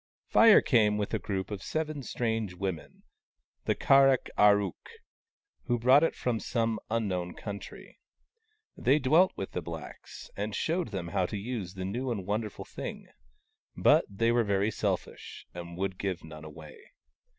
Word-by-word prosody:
Fire 230 -2 +7
came 105 -5 +3
with 105 +1 -3
a 110 - +1
group 95 +1 -4
of 100 -2 -4
seven 155 +1 -3
strange 110 -6 -2
women, 95 -4 -5 0.6
the - - +1
Kar 135 0 +5
ak 130 -2 0
ar 105 0 +6
ook, 100 -2 -6 0.8
who 120 -2 +1
brought 130 +5 +5
it 165 - +1
from 120 -3 -1
some 115 -2 -1
un 115 -1 0
known 90 -2 -3
country. 100 -2 -9 0.8
They 135 +4 +3
dwelt 155 +7 +4
with 95 - -5
the - - -3
blacks, - - -9
and 105 +1 -3
showed 170 +3 -1
them 95 -6 -5
how 90 +1 0
to 105 - -4
use 100 -4 -5
the 95 -1 -4
new 120 +7 -3
and 105 -6 -3
wonderful 105 +1 -3
thing: - - -7 0.7
but - - +5
they 115 +4 +1
were 120 0 +3
very 100 0 +1
selfish, - - -4
and 85 -1 -8
would 95 0 -3
give 95 -4 -3
none 80 -1 -10
away. 75 0 -11
105 Hz, 165 wpm, -29 LUFS, 95-120 Hz, 0.8 s, Fire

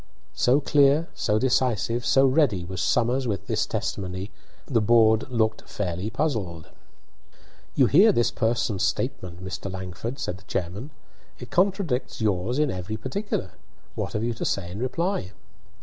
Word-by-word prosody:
So 130 +4 +3
clear, 145 +2 +3
so 105 - 0
decisive, 120 -1 +1
so 135 0 +5
ready, 130 - +2
was 95 +1 -4
Somers 125 +4 +1
with 100 -5 -2
this - - 0
testimony, 95 +1 -4 0.3
that 140 - -9
the 115 - +4
board 110 +1 +4
looked 110 -3 0
fairly 95 0 -3
puzzled. 110 - -2 1.1
"You 130 - +5
hear 190 - +6
this 120 - +2
person's 115 -3 0
statement, 90 0 -2
Mr. 95 0 -5
Langford," 95 +7 -5
said 90 - -3
the - - -20
chairman. 95 - -4 0.5
"It 125 - -10
contradicts 185 -8 0
yours 105 +3 0
in 150 -3 +2
every 95 +4 -4
particular. 195 - -3 0.4
What - - -4
have 105 - -1
you 120 0 0
to 115 - -6
say 90 -3 -2
in 100 - -6
reply?" 130 - -2
115 Hz, 150 wpm, -25 LUFS, 95-130 Hz, 1.1 s, hear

